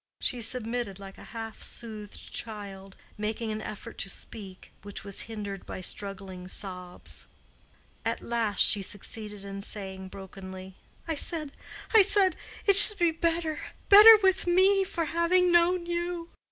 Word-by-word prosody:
She 245 -2 -1
submitted 230 -3 -1
like 195 -1 -12
a - - -12
half 225 -1 -8
soothed 215 -3 -7
child, 195 -3 -7 0.2
making 220 +1 -3
an 215 0 -5
effort 215 -1 -9
to 195 - -1
speak, 195 -3 -10
which 205 0 -7
was 200 -1 0
hindered 205 -3 -6
by - - -7
struggling 190 -1 -3
sobs. 180 -2 -4 0.8
At - - -3
last 230 -3 -1
she 205 - +4
succeeded 205 +1 -3
in 195 0 -7
saying, 190 -2 -6
brokenly, 190 -1 -10 0.3
"I 325 - -1
said—I 315 +7 0
said—it 390 0 +1
should 415 +1 +10
be 345 -2 +2
better—better 335 +6 +5
with 380 -1 +2
me—for 375 -1 +2
having 345 +3 +2
known 345 +1 +3
you." 345 0 -4
225 Hz, 130 wpm, -27 LUFS, -, 0.8 s, should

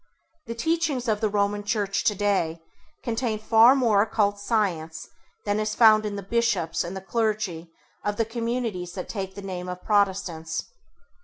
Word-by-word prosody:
The 230 - -4
teachings 300 -1 0
of 215 -1 0
the 215 - +2
Roman 205 0 0
Church 205 -1 -1
today 200 -6 +1 0.4
contain 230 -1 -1
far 225 +4 +6
more 230 -7 +3
occult 205 -2 +1
science 185 -8 -1 0.4
than 205 0 0
is 215 0 -1
found 215 -2 +6
in 205 - -4
the 200 - -5
bishops 200 -6 0
and 175 +3 -5
the - - -6
clergy 205 -5 -2 0.3
of 205 0 -2
the 225 - +1
communities 230 -6 -3
that 185 - -6
take 190 -3 -5
the 200 - -8
name 180 -2 -5
of 180 0 -7
Protestants. 185 -6 0
205 Hz, 160 wpm, -25 LUFS, 190-225 Hz, 0.4 s, far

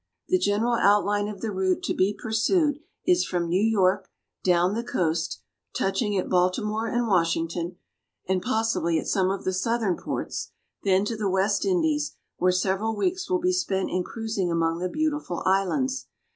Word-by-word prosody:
The 185 - +3
general 205 +5 +1
outline 205 -1 +3
of 210 -2 -7
the 225 - -2
route 190 -1 0
to - - 0
be 190 +2 +2
pursued 290 - +1 0.3
is 360 -1 +4
from 175 -2 -1
New 180 +3 +1
York 195 -3 +2 0.3
down 180 +1 +3
the 230 +2 -2
coast, 165 -7 -1 0.3
touching 200 +1 0
at 185 - -1
Baltimore 210 +5 +1
and 240 +1 0
Washington, 170 -1 0 0.5
and 185 0 +1
possibly 225 -8 +1
at - - -2
some 190 -2 +2
of 195 - -2
the 185 - -1
Southern 220 0 0
ports, - - -4 0.3
then 195 0 +3
to 230 - -2
the 210 -2 -1
West 190 +2 +1
Indies, 320 -6 +1 0.2
where 180 0 +3
several 195 +4 0
weeks 365 - -1
will 370 - +3
be 365 +1 +2
spent 195 - -1
in 185 - +1
cruising 220 -3 -3
among 165 0 0
the 180 +1 -2
beautiful 300 - -2
islands. 255 +8 +1
200 Hz, 170 wpm, -26 LUFS, 185-230 Hz, 0.5 s, is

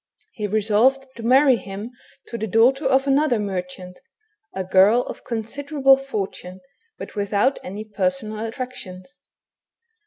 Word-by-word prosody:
He 210 -2 -3
resolved 220 +6 +2
to - - -7
marry 260 +2 +5
him 200 +3 -8 0.3
to - - -8
the 220 - -2
daughter 250 +7 +3
of 265 0 +3
another 275 -2 +2
merchant, 180 -2 -5 0.5
a 190 - -4
girl 195 +6 +4
of - - -9
considerable 270 +5 +1
fortune, 200 -8 -6 0.4
but - - -9
without 205 +6 0
any 205 +4 -7
personal 220 -1 -2
attractions. 205 -7 -8
220 Hz, 125 wpm, -22 LUFS, 200-265 Hz, 0.5 s, marry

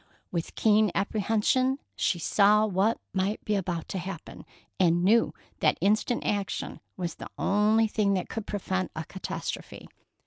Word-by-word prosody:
With 170 -2 -3
keen 215 -1 +4
apprehension, 225 +6 +1 0.2
she 175 - +1
saw 210 +5 +4
what 205 +2 +1
might 195 +3 -1
be 210 - 0
about 175 -4 -2
to 190 - -3
happen, 180 -2 -8 0.3
and 175 -1 +3
knew 225 +5 +4 0.3
that - - +3
instant 215 +4 +1
action 200 -2 -2 0.2
was 175 -3 -3
the - - -9
only 210 +3 +3
thing 210 -2 +1
that 185 - -2
could 225 -2 -5
prevent 190 -2 -2
a 160 - -3
catastrophe. 190 +3 -6
200 Hz, 145 wpm, -28 LUFS, 185-215 Hz, 0.3 s, keen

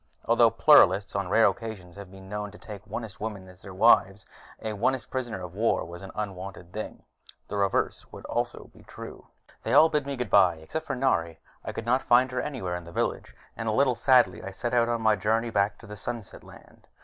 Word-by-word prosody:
Although - - +5
Pluralists 95 +3 +5
on 100 -2 -2
rare 110 +3 +5
occasions 100 -8 -3
have 100 -2 -10
been 95 0 -13
known 105 +1 -4
to 105 - -14
take 105 -2 -10
Onist 110 -4 -7
women 105 -3 -5
as 90 0 -16
their 95 - -10
wives, 95 -1 +3 0.3
an 110 -2 -5
Onist 130 +2 0
prisoner 120 -7 -4
of 90 -1 -8
war 110 -1 0
was 85 +2 -10
an 95 - -9
unwanted 95 -3 -6
thing. 110 - -7 0.4
The 105 - -4
reverse 100 -1 -1
would - - -11
also - - -3
be - - -17
true. - - -11 0.3
They - - -2
all 160 - +7
bid 150 -3 -1
me 140 - -3
goodbye, 100 -7 +4
except 155 - -6
for 135 - -2
Nari. 85 -11 0 0.2
I - - -5
could 115 - -6
not 125 +3 +2
find 125 +1 +3
her 125 - -1
anywhere 115 -12 -4
in 90 -1 -7
the 85 - -11
village, - - -3 0.2
and 115 -1 -3
a - - +1
little 130 +4 +3
sadly 120 -7 +3
I 95 - -5
set 120 +5 -4
out 120 -1 +3
on 115 -1 -1
my 110 - +5
long 105 - -3
journey 115 +3 +1
back 100 -1 +1
to - - -14
the 105 0 -9
Sunset 110 +1 -7
Land. - - -17
105 Hz, 220 wpm, -27 LUFS, 95-120 Hz, 0.4 s, all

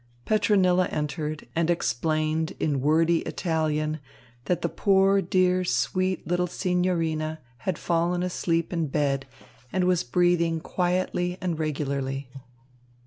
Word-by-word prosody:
Petronilla 185 -4 +3
entered 150 0 -3
and 165 0 +1
explained 155 +1 0
in 145 -4 0
wordy 165 +3 +3
Italian 155 -2 -1 0.5
that 175 -1 -1
the - - +2
poor, 195 0 +3
dear, 185 0 +2
sweet 185 0 0
little 180 +2 0
signorina 165 -4 -1 0.3
had 180 - 0
fallen 175 +1 0
asleep 170 -1 -1
in 165 -3 0
bed 135 -1 0 0.4
and 185 - +1
was 180 -1 +2
breathing 170 +3 +2
quietly 180 +1 -1
and 170 -3 -2
regularly. 140 -3 -2
165 Hz, 115 wpm, -26 LUFS, 155-180 Hz, 0.5 s, Petronilla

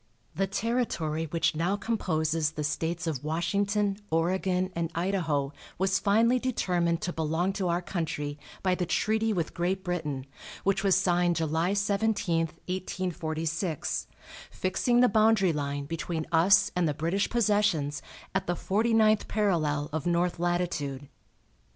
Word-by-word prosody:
The 195 - 0
territory 195 -8 -1
which 165 0 0
now 175 +5 +1
composes 160 -8 0
the 150 - -3
States 160 +3 -2
of 150 -6 -3
Washington, 200 +5 0
Oregon 185 +3 +1
and 170 -1 -1
Idaho 165 -6 0 0.2
was 190 +1 +2
finally 225 +4 +3
determined 175 -9 0
to 175 - -2
belong 160 +4 0
to 190 -2 -1
our 175 +1 0
country 150 -5 -3 0.2
by 185 -1 +3
the 180 -1 -1
treaty 220 +5 +1
with 170 -6 -2
Great 185 +2 -1
Britain, 150 -7 -3 0.4
which 195 0 +1
was 195 -2 +4
signed 175 -2 +2
July 165 +3 0
17, 200 -4 +1 0.2
1846, 165 -3 -3 0.4
fixing 240 +6 +1
the 250 - +6
boundary 215 -4 +4
line 145 -1 -3
between 165 +1 -3
us 175 +4 +5
and 175 -3 +2
the 145 - -2
British 170 +7 0
possessions 205 -10 +1 0.3
at 190 0 -1
the 175 - 0
forty 220 +6 +1
ninth 215 -1 +4
parallel 155 -9 +1
of 160 +1 -2
north 175 0 +1
latitude. 170 -6 -2
175 Hz, 140 wpm, -28 LUFS, 160-195 Hz, 0.4 s, the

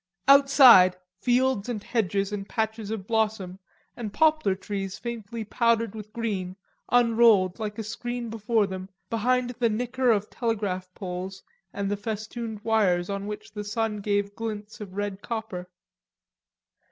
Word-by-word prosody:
Outside, 270 -10 +8 0.2
fields 250 -2 +1
and 215 -4 -3
hedges 200 -3 0
and 200 -1 -5
patches 220 -2 -2
of 215 -3 -4
blossom, 210 -4 -1 0.4
and 225 -4 -5
poplar 310 -8 +3
trees 195 0 -5
faintly 230 -1 -5
powdered 230 0 +1
with 215 -1 -9
green, 200 -6 -3 0.4
unrolled, 230 -5 +4
like 210 -1 -4
a 225 - -3
scroll 240 +3 -4
before 225 -1 0
them, 190 -1 -6 0.2
behind 245 +2 +1
the 235 -2 +3
nicker 245 +3 0
of 210 -2 +2
telegraph 200 -6 -2
poles 190 0 -6 0.3
and 200 0 -3
the 205 - 0
festooned 220 +1 -5
wires 200 -5 +2
on 200 0 -4
which 210 +1 -7
the 210 -1 -5
sun 210 +1 -2
gave 205 0 -1
glints 215 0 -6
of 190 -2 -8
red 205 -1 -3
copper. 215 -6 -5
215 Hz, 140 wpm, -26 LUFS, 200-230 Hz, 0.4 s, Outside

